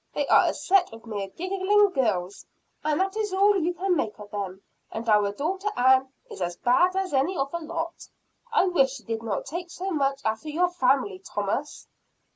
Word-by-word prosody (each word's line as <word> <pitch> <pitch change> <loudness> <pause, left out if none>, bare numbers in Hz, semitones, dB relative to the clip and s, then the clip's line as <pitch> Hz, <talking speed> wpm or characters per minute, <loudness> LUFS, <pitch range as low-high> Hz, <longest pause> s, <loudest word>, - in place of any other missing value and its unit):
They 290 - 0
are - - +6
a - - +1
set 380 -1 +2
of 225 +1 -12
mere 205 -3 -4
giggling 385 - +2
girls; 200 - -1 0.4
and 300 0 +1
that 385 +1 0
is 430 -2 -1
all 400 +2 +4
you 350 -1 0
can 375 0 +1
make 220 -9 -2
of 210 -1 -11
them. 195 -2 -5 0.3
And 225 +1 -5
our 210 -2 +4
daughter 375 - -2
Ann 260 +1 +4 0.2
is - - -10
as 175 0 -2
bad 350 +10 +3
as 385 -4 -1
any 280 +7 +1
of 275 0 -1
the 340 - -3
lot. 335 +1 -5 0.4
I 440 -5 +4
wish 270 -8 +2
she 250 - -11
did 225 -1 -4
not 220 -4 -3
take 345 +2 -5
so 375 +3 -5
much 275 -3 0
after 220 +8 -2
your 350 +4 +2
family, 315 +5 +1
Thomas." 385 - -4
300 Hz, 200 wpm, -26 LUFS, 225-370 Hz, 0.4 s, are